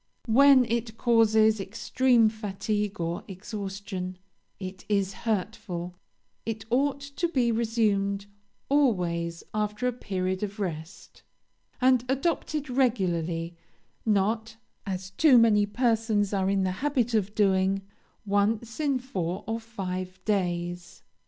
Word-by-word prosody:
When 265 +2 +6
it 230 -1 -2
causes 220 -2 +4
extreme 230 +4 +2
fatigue 210 -1 -2
or 170 +1 -2
exhaustion, 195 -2 -6 0.4
it 185 -1 -7
is 200 -2 +1
hurtful; 195 -4 -3 0.5
it 220 -1 -4
ought 280 +2 +1
to 280 +5 -2
be 255 -8 +1
resumed 210 -4 +1 0.4
always 175 -12 +1
after 210 +2 -1
a 250 - 0
period 185 -5 -2
of 210 0 -4
rest, 165 -2 -6 0.6
and 255 -1 +4
adopted 300 +1 -1
regularly, 175 -10 0 0.5
not, 220 +2 0 0.3
as 190 -1 -4
too 265 +6 +5
many 210 -3 +5
persons 220 -3 +1
are 190 -1 +1
in 195 -1 +2
the 185 - 0
habit 265 -5 +1
of 210 -1 0
doing, 195 -1 +2 0.4
once 210 +4 0
in 285 -3 +1
four 195 -7 -4
or 225 +1 -2
five 185 -5 -5
days. 175 -3 -2
210 Hz, 115 wpm, -27 LUFS, 190-235 Hz, 0.6 s, When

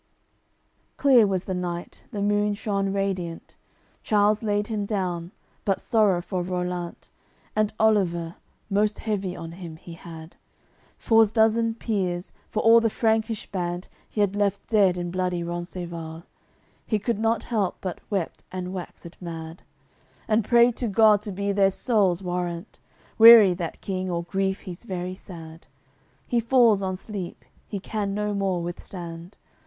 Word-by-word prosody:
CLXXXIV - - -44
Clear 255 -6 +6
was 190 -2 -1
the 190 - -4
night, 175 -1 -5
the 205 -5 -3
moon 205 0 +2
shone 200 -2 -1
radiant. 190 -4 -3 0.5
Charles 210 -1 +2
laid 205 -2 0
him 215 -2 -2
down, 180 -4 -2 0.3
but 195 -2 +1
sorrow 205 -6 +2
for 185 -1 -2
Rollant 180 -1 -4 0.5
And 215 -1 +2
Oliver, 175 -6 +2 0.3
most 210 +1 +1
heavy 195 -4 -2
on 165 0 -7
him 170 -2 -8
he 170 +1 -11
had, 165 -1 -11 0.6
For's 225 -2 +4
dozen 225 0 +3
peers, 185 -6 -2 0.2
for 215 - -1
all 230 +1 +8
the 230 0 +1
Frankish 220 0 0
band 175 -1 -3 0.2
He 210 - -1
had 200 -1 +1
left 205 -2 0
dead 195 -5 +3
in 175 -1 -3
bloody 180 -1 -1
Rencesvals; 170 -1 -6 0.6
He 215 - 0
could 210 +1 -2
not 225 0 +1
help, 210 -6 -1
but 185 -3 -5
wept 195 -5 -3
and 185 0 -5
waxed 180 -1 -9
mad, 165 -1 -7 0.7
And 220 0 +2
prayed 235 +2 +5
to 245 - -1
God 210 0 +5
to 210 - -6
be 200 +1 -1
their 195 -1 +4
souls' 195 -4 +1
Warrant. 175 -1 -4 0.4
Weary 225 -4 +10
that 170 -2 -5
King, 185 -1 -3
or 170 -1 -1
grief 190 +2 -1
he's 180 +2 -9
very 185 -4 -4
sad; 165 -3 -11 0.6
He 240 - +1
falls 230 -3 +4
on 190 -1 -2
sleep, 195 -3 -7 0.2
he 200 - -4
can 200 0 -3
no 210 0 -1
more 190 -3 0
withstand. 170 0 -7
195 Hz, 150 wpm, -25 LUFS, 175-215 Hz, 0.7 s, Weary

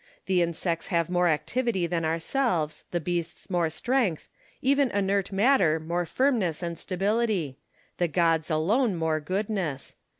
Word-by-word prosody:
The 185 -2 +2
insects 170 0 -1
have 170 -1 0
more 180 0 +3
activity 180 +6 0
than 170 -1 -1
ourselves, 165 - -1
the 175 - -1
beasts 175 +2 -4
more 175 -3 +2
strength, 230 - 0 0.3
even 275 0 +3
inert 200 -1 0
matter 195 - +3
more 170 +2 -2
firmness 215 - +1
and 170 -1 -3
stability; 195 - -1 0.4
the 175 - +2
gods 165 -1 +1
alone 195 +8 +2
more 160 -2 0
goodness. 185 -3 -3
175 Hz, 135 wpm, -27 LUFS, 165-205 Hz, 0.4 s, more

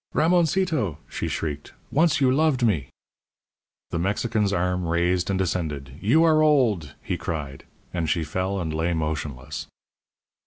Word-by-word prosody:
"Ramoncito!" 165 - +2
she - - -4
shrieked; 75 -2 -4 0.2
"once 160 0 +3
you 130 -2 +4
loved 140 -3 +2
me." 80 - 0 1.0
The 85 - -1
Mexican's 105 +3 0
arm 90 -2 0
raised 85 +2 +1
and 95 - +1
descended. 80 -7 -2
"You 135 +11 +4
are 155 -2 +5
old," 120 - +2
he - - -2
cried; 70 -4 -5 0.3
and 85 -3 -1
she 85 0 +1
fell 95 +5 -2
and 80 -3 -3
lay 80 +2 0
motionless. 75 -3 -4
90 Hz, 140 wpm, -25 LUFS, 80-130 Hz, 1.0 s, are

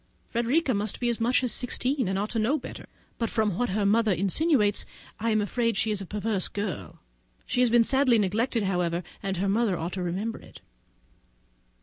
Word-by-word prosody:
Frederica 250 +5 +1
must 205 0 -2
be 240 - 0
as 235 - -1
much 245 +3 +2
as 250 - +2
sixteen, 255 0 +1
and 190 +1 -1
ought 205 +2 -2
to 230 - -1
know 245 +8 +2
better; 270 - -9 0.3
but 230 -2 0
from 215 -4 0
what 245 - +1
her 200 +2 0
mother 220 +1 +3
insinuates, 205 - +2 0.4
I 230 +2 0
am 215 -1 +2
afraid 230 +1 0
she 220 - +1
is 205 -2 -2
a 195 - -7
perverse 210 -1 0
girl. 205 -4 -5 0.5
She - - -2
has 250 - +4
been 235 0 +5
sadly 265 -1 +3
neglected, 220 +3 0
however, 180 -2 0 0.2
and 195 -1 -2
her 195 +3 0
mother 205 -2 +1
ought 165 +2 -4
to 185 - -3
remember 190 +6 -3
it. - - -15
215 Hz, 200 wpm, -27 LUFS, 195-240 Hz, 0.5 s, been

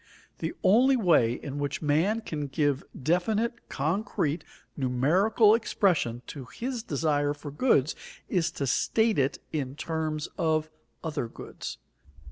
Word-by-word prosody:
The - - -3
only 255 +7 +5
way 160 - +4
in 140 +3 -6
which 145 +2 -2
man 165 +10 +2
can 150 -9 -4
give 145 -1 0 0.2
definite, 215 - 0
concrete, 160 0 -1 0.3
numerical 170 - +3
expression 175 - +1
to 135 -4 -8
his 245 - -4
desire 145 - 0
for 145 0 -8
goods 150 - +2 0.3
is 170 -3 +1
to 140 - -2
state 220 - +2
it 135 0 +1
in 140 -4 -3
terms 155 -1 -2
of 155 -1 +1 0.3
other 155 -7 -2
goods. - - -8
155 Hz, 125 wpm, -28 LUFS, 145-205 Hz, 0.3 s, only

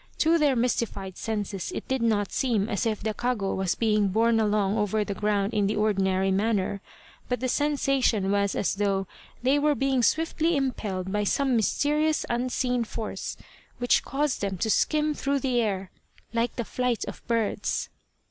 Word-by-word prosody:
To 330 +1 +3
their 290 -3 +3
mystified 230 -6 -1
senses 205 -4 -3
it - - -5
did 265 -1 -1
not 210 -3 +1
seem 225 -6 +1
as 205 +1 0
if 215 -2 -2
the 220 0 -1
kago 220 -4 -1
was 190 -2 0
being 215 -3 +2
borne 225 +3 +2
along 210 -2 +1
over 210 0 +1
the 200 - -3
ground 205 +1 0
in 205 -2 +2
the 210 - 0
ordinary 195 -2 +1
manner, 200 -1 0 0.5
but 250 - 0
the 255 - -1
sensation 270 -8 +1
was 200 -1 +1
as - - 0
though 195 -1 0 0.4
they 270 +3 +3
were 295 0 +2
being 270 -2 +1
swiftly 325 +4 +1
impelled 205 -9 -2
by 210 +1 0
some 265 +5 +1
mysterious 300 +7 +1
unseen 250 0 0
force, 220 -1 -5 0.4
which 245 0 +2
caused 285 0 -1
them 195 -2 -2
to 220 +4 0
skim 305 +4 +2
through 280 -1 -1
the 255 -3 +1
air 195 -4 -2 0.4
like 230 0 0
the 235 - -3
flight 250 -1 -1
of - - -8
birds. 230 -3 -1
225 Hz, 170 wpm, -26 LUFS, 200-260 Hz, 0.5 s, To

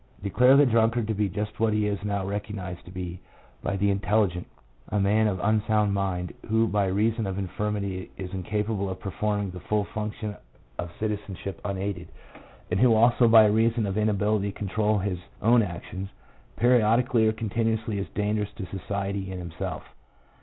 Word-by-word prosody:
Declare 125 +7 +5
the 145 - +7
drunkard 115 -1 +2
to 110 - 0
be 105 -1 0
just 105 +2 -4
what 110 -1 +2
he 105 0 +1
is 100 -1 -2
now 100 -2 -1
recognized 100 -3 -5
to 90 - -11
be 90 -1 -6 0.4
by 100 - -2
the 100 +1 +2
intelli 105 0 +2
gent 90 0 -7 0.3
— - - -24
a 105 - 0
man 105 +2 +3
of 95 -3 -1
unsound 105 -1 +2
mind, 95 -3 -2 0.2
who 110 +1 +3
by 100 -2 +1
reason 110 +3 +1
of 95 0 -3
infirmity 100 -1 -3
is 95 -1 -6
incapable 105 +1 -2
of 95 0 -5
performing 105 +1 -2
the 90 - -8
full 105 +3 0
function 105 0 -5 0.4
of 85 -1 -4
citizenship 100 -3 -4
unaided; 95 -3 -3 0.6
and 90 - +1
who 120 -1 +5
also 120 +2 +5
by 110 -1 +8
reason 110 +2 +2
of 95 -1 -2
inability 105 -1 +1
to - - -14
control 105 +1 0
his 95 -2 -2 0.2
own 120 +1 +5
actions, 95 0 -5 0.5
periodically 120 -1 +3
or - - +4
continuously, 110 0 -1
is 100 - -3
dangerous 105 0 0
to 100 - -6
society 100 +1 -4
and 95 - -5
himself. 85 -2 -5
105 Hz, 175 wpm, -26 LUFS, 95-110 Hz, 0.6 s, by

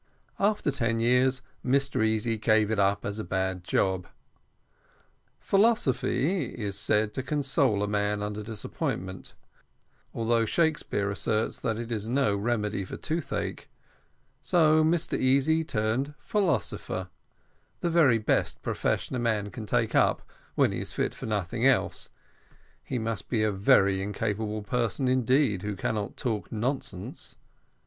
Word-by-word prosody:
After 205 -7 +2
ten 115 -4 0
years, 125 +2 +2 0.2
Mr 135 -2 +1
Easy 110 +1 +1
gave 110 -1 +2
it 110 - 0
up 100 +1 +2
as 100 +2 -3
a - - -3
bad 95 0 -2
job. 95 0 0 1.3
Philosophy 190 - +2
is 100 -4 -3
said 105 +1 +1
to 130 - -2
console 135 -6 +1
a - - 0
man 105 0 0
under 105 +1 -4
disappointment, 95 -3 -5 0.8
although 115 0 +1
Shakespeare 130 - 0
asserts 110 +2 -1
that 110 -1 -1
it 120 0 -5
is 110 -1 -3
no 125 -5 +2
remedy 105 -2 -1
for 95 - -7
toothache; 160 +1 -3 0.7
so 155 -2 +4
Mr 160 +1 +1
Easy 140 +5 +3
turned 130 +2 -1
philosopher, 150 - -1 0.7
the 175 - +1
very 150 -9 +5
best 110 - 0
profession - - -1
a - - -1
man 110 -4 0
can 110 -4 -7
take 115 -1 +1
up, - - +3 0.3
when - - +3
he - - -3
is - - -6
fit - - -1
for - - -7
nothing 105 +2 -2
else; 135 - +1 0.7
he 125 - -3
must 110 -3 -3
be 110 -3 +1
a 110 - +2
very 95 0 +3
incapable 105 +1 -2
person 120 +3 -1
indeed 130 -4 +2
who 105 +1 -3
cannot 105 0 -3
talk 105 -7 -3
nonsense. 115 -4 -3
115 Hz, 140 wpm, -28 LUFS, 105-130 Hz, 1.3 s, very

